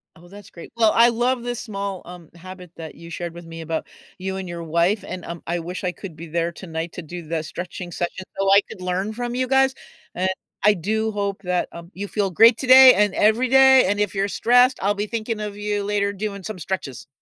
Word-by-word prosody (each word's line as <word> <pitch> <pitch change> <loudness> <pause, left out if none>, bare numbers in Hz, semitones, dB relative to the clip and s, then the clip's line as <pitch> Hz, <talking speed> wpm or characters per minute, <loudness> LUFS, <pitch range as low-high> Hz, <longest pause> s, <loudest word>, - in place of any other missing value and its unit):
Oh, 170 +2 -17
that's 200 +1 -14
great. 170 - -12
Well, 220 -2 +4
I 235 +1 +6
love 245 +2 0
this 245 0 -4
small, 200 -4 -5
um, 175 -2 -12
habit 180 0 -11
that 160 -2 -8
you 170 +1 -12
shared 170 0 -5
with 170 0 -11
me 165 0 -9
about 160 0 -4 0.3
you 190 +1 -4
and 190 -1 -6
your 170 -1 -6
wife, 170 +6 +1
and, 185 -1 -6
um, 170 0 -7
I 175 - -1
wish 175 +3 -6
I 180 - 0
could 180 -2 -10
be 165 +2 -9
there 170 +1 -1
tonight 165 -1 -6
to - - -6
do 175 +1 -8
the 165 0 -2
stretching 175 +2 -7
session 175 +2 -4
so 195 0 +2
I 200 - +7
could - - -10
learn 185 +4 -2
from 240 +1 -4
you 255 +1 -1
guys, 265 0 +3 0.4
and 185 +1 0 0.3
I 210 +1 +5
do 220 +5 -1
hope 200 -1 -3
that, 180 -1 -1
um, 170 0 -11
you 200 +2 -5
feel 200 -1 -1
great 225 +6 +6
today 260 0 +9
and 205 -1 +2
every 220 +5 +3
day, 265 -2 +7
and 205 +1 0
if 205 -2 0
you're 195 0 0
stressed, 245 +5 +3
I'll 200 +1 +2
be 205 +1 -3
thinking 225 0 -3
of 210 -1 -5
you 205 0 -2
later 200 0 0
doing 200 -1 -5
some 205 -1 -6
stretches. 150 -8 -5
195 Hz, 235 wpm, -22 LUFS, 175-215 Hz, 0.4 s, today